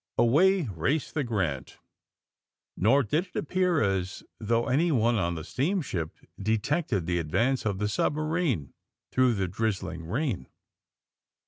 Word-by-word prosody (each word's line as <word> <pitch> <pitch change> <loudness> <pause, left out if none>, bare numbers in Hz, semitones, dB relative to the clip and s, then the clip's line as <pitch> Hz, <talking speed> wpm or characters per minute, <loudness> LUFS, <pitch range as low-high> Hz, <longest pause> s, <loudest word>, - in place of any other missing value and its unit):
Away 180 +10 +4
raced 120 - -1
the 150 - 0
Grant," 95 - -2 1.0
nor 130 +9 +4
did 155 - 0
it 180 - -30
appear 180 0 +1
as 95 -2 -1 0.2
though 115 +1 +1
anyone 130 -4 +2
on 85 -3 0
the 80 - -5
steamship 135 - -2 0.3
detected 110 - 0
the 85 0 0
advance 115 - 0
of 100 -2 -1
the 105 +1 0
submarine 150 - 0 0.4
through 130 -2 +3
the 95 -2 0
drizzling 95 -4 -3
rain. 125 - -2
115 Hz, 125 wpm, -28 LUFS, 95-150 Hz, 1.0 s, Away